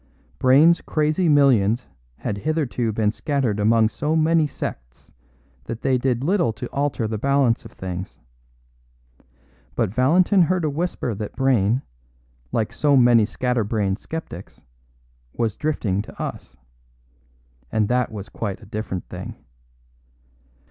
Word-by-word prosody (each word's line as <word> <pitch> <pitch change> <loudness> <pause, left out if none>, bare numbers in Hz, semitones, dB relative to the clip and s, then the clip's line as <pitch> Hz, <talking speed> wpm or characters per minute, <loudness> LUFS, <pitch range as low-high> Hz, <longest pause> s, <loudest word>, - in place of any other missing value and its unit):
Brayne's 150 +7 +5
crazy 155 +3 +1
millions 125 -6 +4 0.3
had 100 - -4
hitherto 135 -5 -1
been 105 -1 +1
scattered 130 -5 -1
among 110 +1 +4
so 150 +6 -1
many 160 0 +3
sects 60 - -8 0.5
that 115 - -6
they 130 -2 +2
did 125 -1 0
little 170 - +2
to 120 - -6
alter 140 -5 -1
the 110 -1 -3
balance 140 -2 +2
of - - -12
things. 90 0 -6 1.6
But 95 - 0
Valentin 175 - +4
heard 175 0 +2
a 150 - 0
whisper 155 -6 -2
that 105 0 -6
Brayne, 125 -2 +2 0.7
like 110 0 -1
so 145 +3 +3
many 120 -3 +5
scatter 125 +2 -1
brained 100 -2 -1
sceptics, 155 - -8 0.7
was 115 -3 -1
drifting 110 -11 -1
to 105 - -13
us; - - -6 1.1
and 110 -2 +1
that 125 +1 +1
was 105 -2 -7
quite 100 -4 -5
a - - -14
different 105 -3 -5
thing. - - -7
125 Hz, 130 wpm, -22 LUFS, 105-150 Hz, 1.6 s, Brayne's